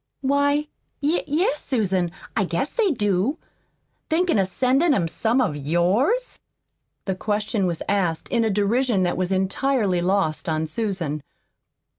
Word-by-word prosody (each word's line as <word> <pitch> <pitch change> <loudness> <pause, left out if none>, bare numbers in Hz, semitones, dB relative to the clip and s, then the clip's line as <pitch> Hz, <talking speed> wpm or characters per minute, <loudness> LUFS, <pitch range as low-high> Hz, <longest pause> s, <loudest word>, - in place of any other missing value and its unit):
"Why, 285 +2 +2 0.4
y 310 +5 +1
yes, 300 0 0
Susan, 190 -8 0 0.3
I 220 - +2
guess 175 - -2
they 455 -5 +2
do. 210 - 0 0.7
Thinkin' 335 - +2
of 190 - +2
sendin' 265 - +2
'em 175 -5 +1
some 225 +9 0
of 210 - +1
yours?" 185 - +1 0.7
The 190 - 0
question 210 +1 -1
was 170 -2 -3
asked 180 -5 0
in 235 -2 +2
a 220 - +1
derision 210 +1 +1
that 175 - 0
was 185 0 -1
entirely 190 0 +1
lost 180 -4 0
on 155 0 0
Susan. 165 -4 -3
205 Hz, 140 wpm, -23 LUFS, 180-270 Hz, 0.7 s, Why